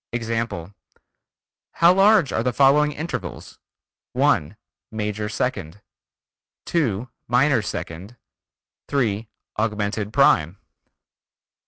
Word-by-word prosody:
Example: 115 -6 -3 1.0
How 170 +1 +5
large 195 -4 +4
are - - 0
the 125 +2 0
following 140 +4 +4
intervals? 160 +4 -6 0.5
(1) 80 +8 +1 0.3
Major 105 -1 -3
second, 100 -7 -3 0.9
(2) 125 - -1 0.2
minor 125 +1 +3
second, 100 +3 -7 0.7
(3) 115 -6 -1 0.3
augmented 105 -1 -2
prime. 95 - +3
115 Hz, 80 wpm, -22 LUFS, 105-140 Hz, 1.0 s, How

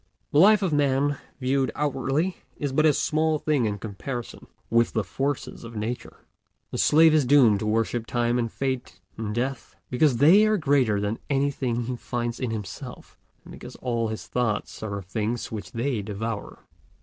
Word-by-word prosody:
The 145 - +4
life 210 +3 +6
of 180 -5 0
Man, 145 0 +2 0.2
viewed 135 +1 +1
outwardly, 145 +5 -1 0.2
is 145 -2 -2
but 155 +4 +3
a 150 - +5
small 155 +2 +1
thing 145 -5 +1
in 105 -1 -1
comparison 115 +4 -6 0.2
with 115 0 +3
the 110 - +1
forces 135 +9 -3
of 115 0 -9
Nature. 110 +3 -5 0.5
The - - -3
slave 160 +1 +6
is 155 -2 +4
doomed 125 -6 +5
to 110 - -3
worship 115 +1 0
Time 120 0 +1
and 115 -2 -1
Fate 130 -2 -3 0.2
and 105 -1 -4
Death, 120 -4 -3 0.2
because 125 0 +3
they 180 - +6
are 215 0 +2
greater 135 - +2
than 105 +2 -2
anything 135 -4 0
he 125 +2 -3
finds 120 0 -3
in 130 - -2
himself, 105 -6 -7 0.3
and - - -12
because - - -10
all 115 -2 -1
his 110 0 -5
thoughts 115 -4 -2
are 100 -2 -3
of 100 - -8
things 110 +5 -3
which 110 -2 -6
they 120 -1 -1
devour. 105 +1 -5
125 Hz, 175 wpm, -25 LUFS, 110-145 Hz, 0.5 s, life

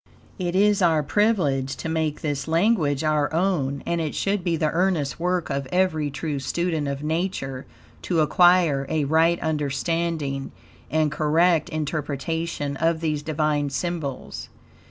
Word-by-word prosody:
It 175 -1 -2
is 205 +1 +3
our 160 -4 +3
privilege 145 -7 +1
to - - -6
make 160 -2 -1
this 145 -2 -2
language 160 -4 +2
our 150 -1 +1
own, 160 -6 0
and 170 -1 -1
it 155 -2 -3
should 200 -2 0
be 170 -2 +1
the 155 -1 +1
earnest 170 -5 0
work 180 -2 -1
of 140 -1 -2
every 170 -5 +1
true 150 0 -3
student 160 +2 -1
of 140 +1 -4
Nature 155 -5 -2 0.3
to 170 -3 +1
acquire 160 -3 +4
a 155 -2 0
right 165 +3 +3
understanding 150 -1 -2 0.4
and 155 -1 +1
correct 160 +2 +2
interpretation 155 -1 -3
of 165 +1 +1
these 155 -3 -1
Divine 150 -1 0
symbols. 140 0 -4
155 Hz, 140 wpm, -24 LUFS, 145-170 Hz, 0.4 s, acquire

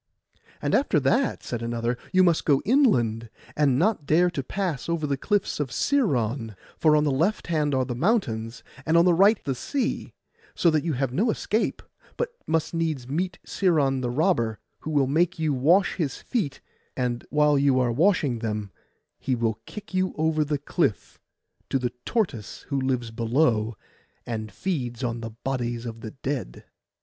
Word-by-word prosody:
'And - - 0
after - - +3
that,' - - +1
said 120 - -4
another, 115 +1 -1 0.2
'you 185 0 +5
must 170 -3 +3
go 140 -3 +2
inland, 120 - +2 0.3
and 140 -4 +3
not 175 -3 +1
dare 175 +3 +4
to 150 - -2
pass 170 -1 -3
over 165 -2 0
the 140 -1 0
cliffs 205 +7 -1
of 145 -3 -1
Sciron; 125 - 0 0.2
for 155 -1 +4
on 150 - +3
the 150 - +1
left 170 +11 0
hand 150 -4 0
are 130 -1 +1
the 125 - -3
mountains, 120 - -1 0.2
and 160 +3 +2
on 170 - +6
the 180 - +5
right 200 +6 +5
the 135 - -1
sea, 255 - -3 0.4
so 170 - +3
that 155 -2 +1
you 165 -2 -1
have 130 -1 -1
no 215 - +2
escape, 220 0 -1 0.3
but 485 - -1 0.2
must 160 0 0
needs 160 -7 -1
meet 180 +6 -2
Sciron 145 -8 +1
the 125 - -1
robber, 120 - +1 0.2
who - - -6
will 145 -3 +3
make 170 +7 +1
you 155 -2 0
wash 165 +9 +3
his 150 -8 -1
feet; 195 - -3 0.4
and 125 -2 -1
while 150 0 +3
you 140 -2 +3
are 125 -2 +2
washing 145 - +2
them 105 -3 -3 0.5
he 130 - 0
will 115 -2 -1
kick 210 -2 -9
you 185 0 0
over 155 0 +2
the 150 0 -1
cliff, 145 - -2 0.5
to - - +2
the 125 -2 -2 0.2
tortoise 160 - -2
who 140 -2 0
lives 125 -3 -1
below, 115 -1 +1 0.5
and 110 -2 -4
feeds 125 - -3
upon 120 -1 -2
the 115 - -5
bodies 120 0 -3
of 115 -1 -7
the 110 - -6
dead. 130 - -5
140 Hz, 180 wpm, -25 LUFS, 120-170 Hz, 0.5 s, on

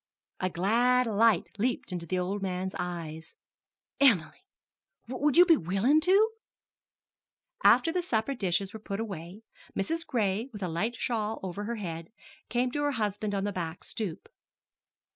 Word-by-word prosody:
A 185 - 0
glad 240 +8 +3
light 220 -3 +3
leaped 245 -2 -1
into 175 -2 -4
the 185 - -1
old 190 +3 -2
man's 185 0 -2
eyes. 165 -3 -5 0.6
"Em'ly 205 - +3 0.7
would 270 +4 0
you 355 - +9
be 335 -2 +7
willin' 205 - +2
to?" 395 +6 +4 1.3
After 330 - +6
the 360 +1 0
supper 245 -5 0
dishes 195 -4 -1
were 220 - -7
put 200 -1 -5
away, 195 -1 -6 0.3
Mrs. 330 +12 -1
Gray, 220 -1 0
with 210 -3 -7
a - - 0
light 195 +9 -1
shawl 225 -3 -2
over 190 +2 -4
her 235 +2 -2
head, 170 -5 -6 0.4
came 245 +1 +1
to 290 - -2
her 290 -1 +1
husband 210 -3 -1
on 195 - -1
the 205 0 -2
back 170 -2 -4
stoop. 200 -8 -5
210 Hz, 155 wpm, -29 LUFS, 185-245 Hz, 1.3 s, you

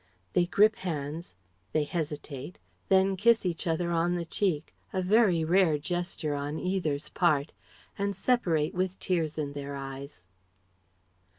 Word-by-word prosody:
(They 175 -1 +3
grip 215 +4 +4
hands, 155 - -4 0.4
they 155 - +3
hesitate, 150 -1 -5 0.3
then 190 0 +4
kiss 225 +2 +4
each 175 0 -2
other 170 +1 0
on 170 +1 +2
the 170 -1 -2
cheek, 165 -3 -1 0.2
a 190 - -1
very 185 -3 +4
rare 170 -2 +4
gesture 175 -1 -2
on 145 +2 -3
either's 175 -6 -1
part 155 -4 +2 0.5
and 200 0 0
separate 175 -8 +1
with 185 +1 -1
tears 165 -4 -1
in 145 -2 -2
their 140 0 -5
eyes.) 135 -7 -8
170 Hz, 135 wpm, -29 LUFS, 150-185 Hz, 0.5 s, grip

